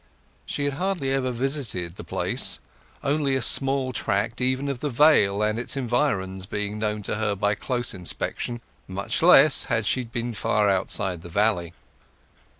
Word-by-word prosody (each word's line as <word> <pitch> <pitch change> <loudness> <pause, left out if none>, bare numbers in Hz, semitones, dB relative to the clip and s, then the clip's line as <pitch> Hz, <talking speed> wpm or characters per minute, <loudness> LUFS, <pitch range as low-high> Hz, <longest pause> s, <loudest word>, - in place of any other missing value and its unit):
She 145 - -3
had 145 - -1
hardly 175 -4 -2
ever 130 -1 0
visited 120 - -1
the - - -9
place, - - 0 0.4
only 140 -1 0
a 130 - 0
small 135 -1 +3
tract 100 +3 -1
even 130 +2 0
of 140 -3 -3
the 145 - -2
Vale 115 -7 +4
and 110 +1 0
its 125 - -1
environs 105 -8 -1
being 105 +1 -3
known 105 -1 -2
to 105 - -2
her 105 -2 0
by 105 +1 +1
close 120 +3 -2
inspection. 105 +6 -3 0.3
Much 95 +1 -3
less 155 -4 +6
had 115 -4 -1
she 130 +4 0
been 120 0 -4
far 105 -1 +1
outside 95 -2 0
the 85 - -11
valley. 90 -3 0
115 Hz, 160 wpm, -24 LUFS, 100-135 Hz, 0.4 s, less